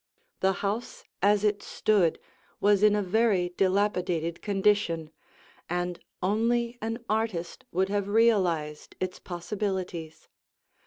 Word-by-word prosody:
The 190 0 +3
house 215 +5 -3 0.2
as 205 +1 +4
it 205 -1 +1
stood 195 -7 +2 0.4
was 205 -1 +4
in 210 0 +5
a 210 - +1
very 195 -2 +2
dilapidated 180 -3 0
condition, 195 -6 +1 0.6
and 175 0 -2 0.2
only 235 +4 +1
an 225 +2 -4
artist 215 -6 -2
would 190 +2 +1
have 200 -1 -1
realized 185 -9 +1
its 185 -1 -3
possibilities. 180 -3 -4
195 Hz, 110 wpm, -28 LUFS, 175-210 Hz, 0.6 s, in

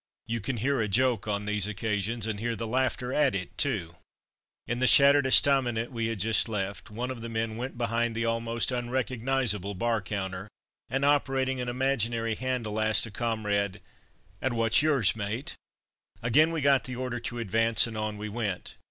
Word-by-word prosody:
You 115 +1 -2
can 125 +4 -3
hear 135 +3 0
a 110 - 0
joke 120 +1 +1
on 105 -1 -2
these 105 -1 +1
occasions, 110 +1 -2
and 110 -3 -3
hear 120 +1 -2
the 115 - -4
laughter 125 +1 -1
at 145 -7 +2
it 90 -2 -4
too. 85 0 -2 0.7
In 120 +1 -3
the 130 - +3
shattered 140 +1 +7
estaminet 125 -4 +3
we 115 -2 -2
had 115 -2 -3
just 110 +3 +1
left, 100 -4 -4
one 120 +4 -4
of 125 -3 -7
the 115 - -5
men 110 -1 -2
went 125 +2 -5
behind 115 0 0
the 115 +1 -1
almost 115 +1 0
unrecognizable 120 -4 -1
bar 115 +3 0
counter, 95 -1 -5 0.4
and 135 +1 0
operating 135 -2 +1
an 125 - -3
imaginary 120 -3 0
handle, 115 -3 -2
asked 110 +1 +3
a 115 - -9
comrade, 105 -3 -1 0.6
"And 130 -3 -1
what's 115 +1 +4
yours, 140 -10 +3
mate?" 105 +5 -4 0.7
Again 150 +8 +4
we 165 -2 -2
got 140 -1 +3
the 130 - -5
order 125 -1 -3
to 120 +1 -5
advance, 115 0 +3
and 115 -2 -7
on 110 -1 -3
we 105 +1 -5
went. 105 -4 -4
115 Hz, 180 wpm, -28 LUFS, 105-130 Hz, 0.7 s, shattered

